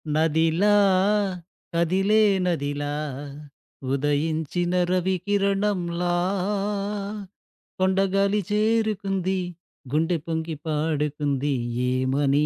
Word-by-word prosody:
నదిలా 160 +4 +2 1.1
కదిలే 190 +6 +3 0.2
నదిలా 145 -4 -1 1.0
ఉదయించిన 155 +4 0 0.2
రవికిరణంలా 185 -1 0 1.6
కొండగాలి 195 +2 +2
చేరుకుంది 210 -3 +1 0.5
గుండె 165 +4 +1
పొంగి 160 -1 -3
పాడుకుంది 150 -2 -1 0.4
ఏమని 135 +3 +2
170 Hz, 55 wpm, -24 LUFS, 150-195 Hz, 1.6 s, కదిలే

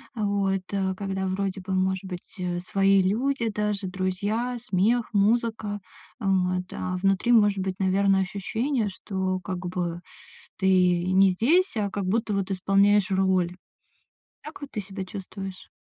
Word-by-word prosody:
Вот, 200 -3 0
э, 190 -1 0
когда, 195 -1 -3
вроде 195 0 -2
бы, 190 +1 -4
может 190 0 0
быть, 180 -1 -8
э, 175 -1 -2
свои 195 +1 +3
люди 235 +4 0
даже, 210 -2 -2
друзья, 205 +6 -2
смех, 220 +4 +1
музыка. 215 0 +1 0.4
Вот, 185 -3 +1
а 185 0 -3
внутри 195 +5 +2
может 205 -3 +4
быть, 190 0 -2
наверно, 195 +1 +3
ощущение, 220 +5 -1
что 190 -1 -3
как 180 0 -4
бы 175 -1 -3 0.6
ты 190 - 0 0.5
не 195 0 +6
здесь, 295 - +2
а 205 -1 0
как 200 -2 -3
будто 215 +2 0
вот 195 0 -1
исполняешь 195 +1 +3
роль. 185 -2 +2 0.9
Так 305 0 -10
вот 285 - -7
ты 210 - -3
себя 190 0 -6
чувствуешь? 195 -1 -8
195 Hz, 145 wpm, -26 LUFS, 185-210 Hz, 0.9 s, не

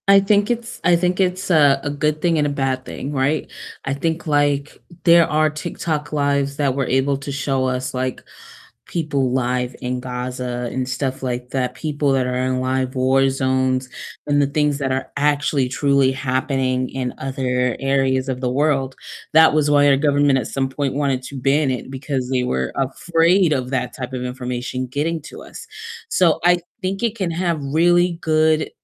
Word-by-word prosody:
I 200 0 +7
think 205 +1 +2
it's 235 -1 -3
I 175 - +5
think 180 +2 0
it's 185 0 0
a 145 -4 +5
a 145 - -2
good 150 +1 -1
thing 170 -2 +2
and 150 -1 +2
a - - 0
bad 135 -2 -2
thing, 140 - -6
right? 145 +2 0 0.4
I 135 - -1
think, 160 +4 -2
like, 145 -1 +1 0.3
there 170 -1 +6
are 155 0 +2
TikTok 155 -1 -4
Lives 140 -1 0
that 140 -3 +1
were 135 -2 -1
able 135 +2 +1
to 140 +1 -6
show 135 -1 -1
us, 130 0 -2
like, 130 0 -3 0.6
people 145 -6 -1
live 125 -1 -1
in 125 0 -2
Gaza 125 -1 -4
and 130 -1 -2
stuff 135 +1 -3
like 125 -1 -3
that, 125 -2 -1
people 145 0 -1
that 130 -1 +1
are 125 0 -2
in 130 0 0
live 130 0 -1
war 135 +1 +3
zones 130 -1 0 0.4
and 145 0 +3
the 140 - +3
things 150 0 0
that 135 -2 -1
are 130 0 -3
actually 145 -2 +1
truly 140 0 +2
happening 130 -1 -1
in 130 -2 -3
other 125 -2 -1
areas 135 -1 +1
of 130 -1 -3
the 125 -1 -1
world, 135 -1 +1 0.4
that 160 0 +7
was 150 -1 +2
why 145 0 +5
our 140 - +5
government 145 -1 +3
at 120 - -3
some 135 -1 -1
point 135 0 -2
wanted 140 -2 0
to 140 - -9
ban 135 +3 +2
it 125 - -5
because 130 -1 -3
they 125 -1 +1
were 65 - -1
afraid 165 +6 +2
of 130 -3 -1
that 130 -2 -2
type 125 -1 -6
of 130 -1 -4
information 125 0 -4
getting 150 +6 -2
to - - -10
us, - - -11 0.4
so 175 - +3
I 175 0 +4 0.2
think 195 +2 -3
it 230 -1 0
can 185 -4 -1
have 170 -2 -1
really 175 +5 +3
good, 155 0 +2
135 Hz, 185 wpm, -20 LUFS, 130-155 Hz, 0.6 s, I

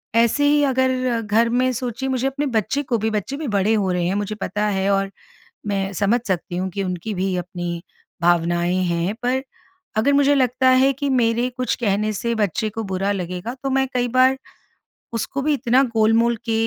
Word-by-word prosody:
ऐसे 235 +5 +3
ही 290 0 +4
अगर 255 -2 +1
घर 225 +2 +2
में 255 +2 +2
सोचिए 250 +2 -3
मुझे 260 0 0
अपने 280 +2 -2
बच्चे 265 +3 0
को 245 -3 0
भी 220 +1 0
बच्चे 215 +7 -3
भी 310 - -4
बड़े 205 +1 +2
हो 200 -4 +1
रहे 180 -1 0
हैं 190 - 0
मुझे 205 +1 -2
पता 210 +1 -2
है 195 -1 0
और 195 0 0 0.6
मैं 195 -1 -1
समझ 205 +6 +2
सकती 175 -1 -2
हूँ 185 +1 -2
कि 195 +1 -3
उनकी 185 +3 -4
भी 185 0 -1
अपनी 175 -1 -4 0.4
भावनाएँ 175 +1 +2
हैं। 170 +4 -1
पर 255 +2 +1 0.6
अगर 275 +6 +3
मुझे 285 0 +4
लगता 255 -1 +3
है 260 +1 +5
कि 280 +1 -3
मेरे 240 -1 +2
कुछ 255 0 0
कहने 215 -1 0
से 235 +3 -2
बच्चे 215 +1 0
को 225 +1 -5
बुरा 195 0 -1
लगेगा 180 +3 -4
तो 270 - -1
मैं 265 0 +2
कई 245 -1 +1
बार 255 +2 +4 0.8
उसको 230 +4 -2
भी 300 +2 +1
इतना 255 -1 +3
गोलमोल 225 +2 +3
के 230 - -1
225 Hz, 195 wpm, -21 LUFS, 195-255 Hz, 0.8 s, है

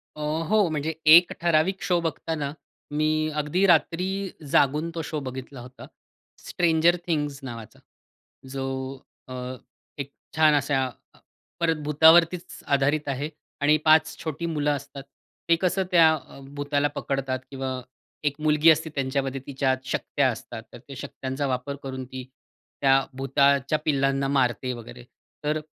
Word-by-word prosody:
अ, 150 - -8 0.3
हो 210 -4 +4
म्हणजे 155 +1 -2 0.2
एक 175 +1 +6
ठराविक 170 +3 +2
शो 175 -2 +2
बघताना 160 -3 -3 0.5
मी 155 0 +1
अगदी 180 +7 +1
रात्री 170 +2 +3 0.4
जागून 150 +4 +3
तो 165 - -2
शो 155 - -2
बघितला 130 +1 -7
होता. 125 +1 -12 0.5
स्ट्रेंजर 170 0 +2
थिंग्स 145 -4 -1
नावाचा. 115 -3 -9 0.7
जो 135 0 -4 0.6
अ, 130 - -8 0.6
एक 140 0 -5 0.2
छान 155 -1 +5
असा 145 -2 +1 0.3
अ, - - -23 0.4
परत 165 -1 +2
भुतावरतीच 160 +4 +4
आधारित 140 +2 +1
आहे 140 +3 -2 0.3
आणि 150 +2 +4
5 155 0 +5
छोटी 160 +1 -4
मुलं 150 -3 0
असतात. 140 0 -8 0.5
ते 165 - +6
कसं 190 +1 +1
त्या 165 -2 +7
अ, 135 -1 -12 0.2
भुताला 145 0 0
पकडतात 135 -2 -2
किंवा 130 -1 -4 0.4
1 145 -1 0
मुलगी 155 +1 +4
असते 160 +1 +3
त्यांच्यामध्ये 135 0 -2
तिच्या 135 -1 +1
शक्त्या - - 0
असतात. - - -8
तर - - -9
त्या - - -12
शक्त्यांचा 135 +2 -4
वापर 130 +2 -2
करून 130 -1 -5
ती 130 0 -8 0.6
त्या 135 0 +5 0.2
भुताच्या 140 +2 +2
पिल्लांना 135 -2 +1
मारते 125 -2 0
वगैरे. 120 +1 -10 0.4
तर 150 +1 0
145 Hz, 140 wpm, -25 LUFS, 135-160 Hz, 0.7 s, त्या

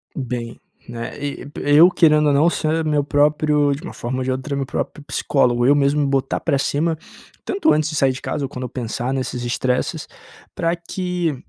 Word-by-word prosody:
Bem, 120 -3 -5 0.3
né, 120 0 -6
e 145 0 -5
eu, 150 +5 +7
querendo 155 -4 +4
ou 145 - +3
não, 150 +4 +4
ser 160 -1 0
meu 150 -2 +1
próprio, 150 0 +2
de 140 - -6
uma 180 - -8
forma 125 +2 -4
ou - - -1
de 130 - -1
outra, 130 +2 -3
meu 140 -1 -2
próprio 145 +2 -4
psicólogo, 125 -4 +1
eu 140 - +6
mesmo 145 +1 +2
botar 135 -1 0
pra 140 - 0
cima, 160 +4 0 0.5
tanto 385 -5 +2
antes 155 0 +1
de 155 - -5
sair 135 -2 +3
de 130 - -7
casa 145 -2 -3
ou - - -7
quando 130 -1 -6
eu 125 - -4
pensar 120 0 -3
nesses 130 -2 -3
estresses, 125 +1 -1 0.5
pra 165 +1 0
que 175 -2 -3
145 Hz, 200 wpm, -20 LUFS, 130-155 Hz, 0.5 s, eu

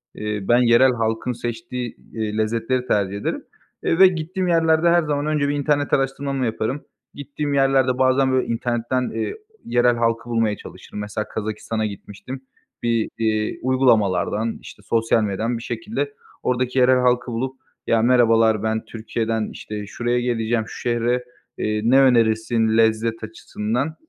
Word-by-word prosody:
eee, 105 0 -3
ben 120 - +5
yerel 120 +2 +5
halkın 115 +1 -1
seçtiği, 120 +1 -5 0.2
iii, 110 -1 -3
lezzetleri 115 +3 0
tercih 100 -1 0
ederim, 100 - -3 0.4
eee, 165 - +1
ve 190 - +10
gittiğim 180 +2 -2
yerlerde 165 -1 +3
her 170 0 +4
zaman 145 -1 -1
önce 150 -2 +1
bir 145 - 0
internet 145 0 0
araştırmamı 135 0 0
yaparım. 115 +5 -3 0.3
Gittiğim 145 +1 -4
yerlerde 135 -2 +3
bazen 130 +1 +3
böyle 130 0 +1
internetten, 120 +2 -1
eee, 115 0 -3 0.3
yerel 120 0 +3
halkı 115 0 -1
bulmaya 115 -3 +1
çalışırım. - - -10
Mesela 105 +1 -4
Kazakistan'a 110 +1 -3
gitmiştim, 105 +5 -8 0.4
bir, 115 -2 +1
iii, 110 -1 -1
uygulamalardan, 115 -4 +2
işte, - - -12
sosyal 115 -1 +1
medyadan 110 +4 -1
bir 115 - -8
şekilde 215 - -4 0.3
ordaki 125 +1 0
yerel 130 +1 +5
halkı 125 0 +1
bulup 130 +3 -3 0.3
"Ya, 115 -1 +3
merhabalar, 115 -3 +4
ben 110 0 -1
Türkiye'den 110 0 -3
işte 105 -1 -7
şuraya 120 +3 -1
geleceğim 120 -2 0
şu - - -9
şehre, 120 +1 0 0.3
eee, 105 0 -1
ne 125 +4 +5
önerirsin 115 -2 +3
lezzet 115 0 +1
açısından? 110 +6 -3
120 Hz, 145 wpm, -22 LUFS, 110-130 Hz, 0.4 s, ve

